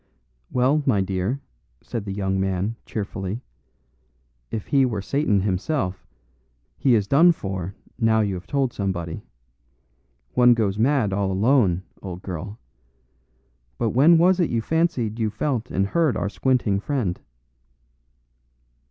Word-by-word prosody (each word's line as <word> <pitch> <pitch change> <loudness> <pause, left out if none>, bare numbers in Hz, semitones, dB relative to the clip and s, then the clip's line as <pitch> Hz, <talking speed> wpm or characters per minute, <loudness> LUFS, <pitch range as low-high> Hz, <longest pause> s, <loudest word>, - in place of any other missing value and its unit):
"Well, 130 +5 +2
my 105 -7 +3
dear," 95 +8 -2 0.4
said 115 -3 -5
the 100 - -4
young 95 -1 -1
man, 95 +3 -1
cheerfully, 100 +2 -4 1.1
"if 110 - -4
he 140 -1 +3
were 115 -5 0
Satan 105 -2 +1
himself, 95 - -2 0.7
he 130 -4 +3
is 105 -3 +2
done 160 - +6
for 95 - -5 0.2
now 110 -1 +3
you 100 -2 0
have 90 -1 -7
told 135 -3 0
somebody. 85 -5 -3 1.1
One 125 -1 +6
goes 105 -3 0
mad 120 -5 +2
all 100 -1 0
alone, 100 -3 +2 0.2
old 90 -1 -7
girl. 95 +4 -6 1.2
But 115 -2 0
when 155 +7 +6
was 180 +3 +4
it 175 - +2
you 115 - 0
fancied 130 -6 0
you 110 -1 +1
felt 125 +1 -2
and 95 +1 0
heard 155 +6 +1
our - - -1
squinting 115 -4 +1
friend?" 110 -6 -2
110 Hz, 135 wpm, -23 LUFS, 95-130 Hz, 1.2 s, done